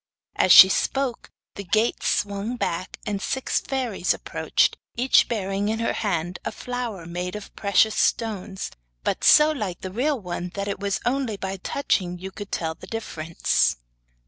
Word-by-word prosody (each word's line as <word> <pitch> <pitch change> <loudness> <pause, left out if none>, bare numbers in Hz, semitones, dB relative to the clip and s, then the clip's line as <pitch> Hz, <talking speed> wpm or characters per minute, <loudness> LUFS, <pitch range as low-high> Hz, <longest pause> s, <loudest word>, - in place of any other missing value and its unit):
As 185 - +3
she 185 - +12
spoke 260 +5 -1 0.2
the 200 - -7
gates 215 +5 +1
swung 205 +4 -1
back 185 -5 -3
and 205 -2 -2
six 265 +5 -1
fairies 250 -9 -1
approached, - - 0 0.2
each 250 +3 +4
bearing 200 -2 -1
in 220 - 0
her 230 0 -1
hand 175 -4 -2
a - - -3
flower 235 -6 -5
made 180 +3 -4
of 210 -1 -9
precious 210 +2 +3
stones, 200 -3 -1 0.3
but - - -1
so 300 +1 +7
like 205 - -4
a 185 - -4
real 265 +6 0
one 180 -2 -5
that 200 0 -3
it 200 - -3
was 200 -1 -2
only 245 -4 0
by 195 0 -4
touching 185 -4 -1
you 190 +2 -7
could 205 +1 -9
tell 160 -1 -2
the - - -13
difference. 165 - 0
200 Hz, 165 wpm, -24 LUFS, 185-230 Hz, 0.3 s, she